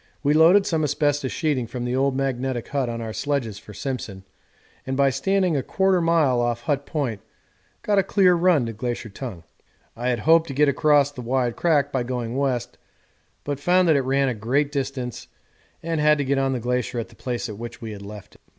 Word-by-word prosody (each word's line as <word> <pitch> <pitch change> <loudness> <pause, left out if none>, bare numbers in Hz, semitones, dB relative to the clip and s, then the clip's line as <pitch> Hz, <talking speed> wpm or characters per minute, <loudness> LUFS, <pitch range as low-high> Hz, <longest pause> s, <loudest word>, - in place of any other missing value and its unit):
We 145 +1 +3
loaded 170 +6 +6
some 160 -2 0
asbestos 145 -2 0
sheeting 145 -8 -1
from 120 +1 -5
the 125 +1 -1
old 135 0 +1
magnetic 130 -2 -2
hut 135 -4 -1
on 115 0 -4
our 110 -1 -5
sledges 125 -8 -2
for 105 - -13
Simpson, 105 -3 -5 0.6
and 130 0 -3
by 140 -1 +4
standing 185 +6 +1
1/4 185 +7 +1
mile 160 -7 +3
off 120 0 -1
Hut 140 +1 -2
Point 125 -10 -2 0.6
got 205 -1 +2
a - - +3
clear 190 -1 +4
run 170 -6 +3
to 115 - -4
Glacier 120 +1 -4
Tongue. 100 -5 -8 0.5
I 120 +2 -2
had 120 -3 -1
hoped 165 +3 +4
to 135 - -6
get 150 +1 +4
across 145 0 +3
the 135 -3 -8
wide 125 0 0
crack 145 -4 +2
by 130 - 0
going 120 -1 -3
west, 130 -3 -2 0.6
but 145 -1 -3
found 180 +4 +3
that 155 - +5
it 140 - +3
ran 135 +1 +1
for - - +1
a 110 - -7
great 140 +7 0
distance 135 -3 -4 0.6
and 165 -2 -1
had 150 0 +4
to 145 - -1
get 135 +1 +1
on 135 0 +1
the 125 - -2
glacier 125 +1 -2
at 115 - -3
the - - -18
place 125 -1 -4
at 105 -2 -8
which 120 0 -7
we 115 -2 -7
had 100 -1 -8
left 100 0 -10
it. - - -22
135 Hz, 215 wpm, -23 LUFS, 120-150 Hz, 0.6 s, loaded